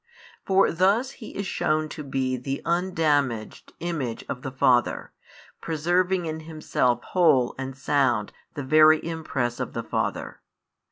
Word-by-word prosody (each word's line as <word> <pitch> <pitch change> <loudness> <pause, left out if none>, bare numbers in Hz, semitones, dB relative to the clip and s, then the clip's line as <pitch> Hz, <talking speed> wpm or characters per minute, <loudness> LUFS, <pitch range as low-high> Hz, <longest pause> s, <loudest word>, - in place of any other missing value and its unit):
For 195 0 +4
thus 200 +10 +2
He 225 - -10
is 200 - -3
shewn 155 -3 0
to 150 - -7
be 135 -2 -1
the 135 +2 -4
undamaged 155 - 0
Image 155 -9 -3
of 125 - -5
the 135 - -5
Father, 130 -2 +2 0.5
preserving 175 +3 0
in 160 0 -4
Himself 155 -6 -1
whole 140 -9 +3
and 135 0 -5
sound 130 -6 +1 0.2
the 145 - -4
Very 155 +3 +6
Impress 145 -7 -3
of - - -4
the - - -3
Father. - - -3
155 Hz, 135 wpm, -25 LUFS, 130-170 Hz, 0.5 s, Very